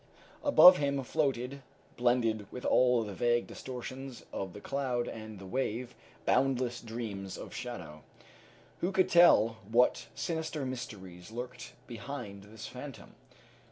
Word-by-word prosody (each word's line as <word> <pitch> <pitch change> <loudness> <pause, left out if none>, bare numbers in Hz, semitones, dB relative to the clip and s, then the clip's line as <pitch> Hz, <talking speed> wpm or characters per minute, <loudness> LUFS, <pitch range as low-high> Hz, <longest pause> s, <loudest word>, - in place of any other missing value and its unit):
Above 185 -10 +9
him 140 -1 0
floated, 135 -2 -1 0.3
blended 115 -4 +1
with 125 - -7
all 125 -2 +4
the 105 -2 -6
vague 120 +4 +2
distortions 130 0 -7
of 95 -2 -4
the 105 - -8
cloud 130 -1 -1
and 110 -1 -7
the 95 - -10
wave, 125 +2 -2 0.3
boundless 125 -2 +2
dreams 110 -5 -5
of - - -8
shadow. 90 -12 -7 0.8
Who 180 - 0
could 190 -1 +3
tell 115 -10 +6
what 125 +2 +3
sinister 160 -3 -2
mysteries 105 -9 -7
lurked 125 +2 -7
behind 115 -4 -7
this 110 +1 -10
phantom? 125 -4 -9
120 Hz, 125 wpm, -31 LUFS, 110-135 Hz, 0.8 s, Above